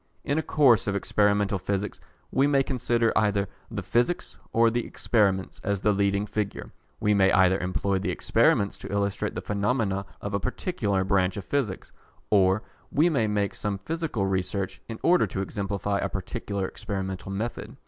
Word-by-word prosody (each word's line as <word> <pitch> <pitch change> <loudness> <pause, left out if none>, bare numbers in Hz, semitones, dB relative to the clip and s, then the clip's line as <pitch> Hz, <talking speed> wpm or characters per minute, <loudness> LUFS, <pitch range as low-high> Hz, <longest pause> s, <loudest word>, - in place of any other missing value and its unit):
In 145 +3 0
a - - +1
course 135 -9 +4
of 100 - 0
Experimental 100 0 +2
Physics 100 +2 -2 0.3
we 135 +2 +3
may 140 -2 +3
consider 120 -3 +1
either 100 -2 +2 0.2
the - - -4
Physics 120 +9 0 0.2
or 115 0 +4
the 120 +1 0
Experiments 100 -5 0
as 100 -1 -1
the 105 - +3
leading 100 0 +1
feature. 105 -1 -4 0.3
We 105 - +2
may 95 -1 +4
either 95 0 +4
employ 95 +1 0
the 95 0 -2
experiments 100 +2 +2
to - - -8
illustrate 100 0 -1
the - - -4
phenomena 100 -2 0
of 100 - -5
a 100 - +1
particular 100 - -1
branch 95 -1 +1
of 100 - -5
Physics, 130 -10 -2 0.4
or 95 +1 +4 0.3
we 155 +5 +4
may 120 -9 +1
make 105 -1 0
some 105 -1 -2
physical 155 - -2
research 95 0 -2
in 115 - -5
order 180 +1 +4
to 95 - -3
exemplify 100 0 -2
a - - -1
particular 100 0 -3
experimental 95 -3 -5
method. 110 +5 -4
100 Hz, 170 wpm, -26 LUFS, 95-115 Hz, 0.4 s, course